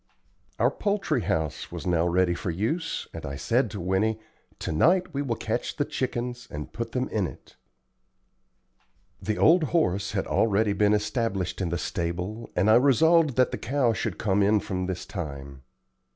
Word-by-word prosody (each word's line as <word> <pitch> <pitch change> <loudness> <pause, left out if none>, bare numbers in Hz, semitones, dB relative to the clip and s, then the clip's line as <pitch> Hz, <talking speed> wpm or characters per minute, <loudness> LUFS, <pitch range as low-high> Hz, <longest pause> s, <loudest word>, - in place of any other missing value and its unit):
Our - - +3
poultry 200 - 0
house 80 -4 -2
was - - -6
now 85 -1 +2
ready 90 0 +2
for 85 - -4
use, 115 - -2
and 80 - -7
I 70 -2 -5
said 115 - +1
to 105 - -6
Winnie, 95 +5 0 0.4
"To - - -4
night 180 - +3
we 140 - -1
will 125 -5 -1
catch - - -3
the - - 0
chickens 125 -1 -3
and 75 0 -7
put 115 0 -5
them 130 0 0
in 100 -4 0
it." - - -14 1.7
The 110 -1 -2
old 165 0 +5
horse 100 - 0
had 95 - -1
already 105 -1 +2
been 105 +1 +3
established 105 -4 -2
in 90 - -1
the 85 - -1
stable, 90 +8 -3
and 95 +4 +2
I 110 +2 +7
resolved 150 +3 +4
that 130 -1 +3
the 125 - -4
cow 125 +1 +1
should - - -3
come 100 -1 +1
in 105 +2 +4
from 95 -2 -3
this 95 -1 -4
time. 70 -6 -7
105 Hz, 175 wpm, -26 LUFS, 90-125 Hz, 1.7 s, I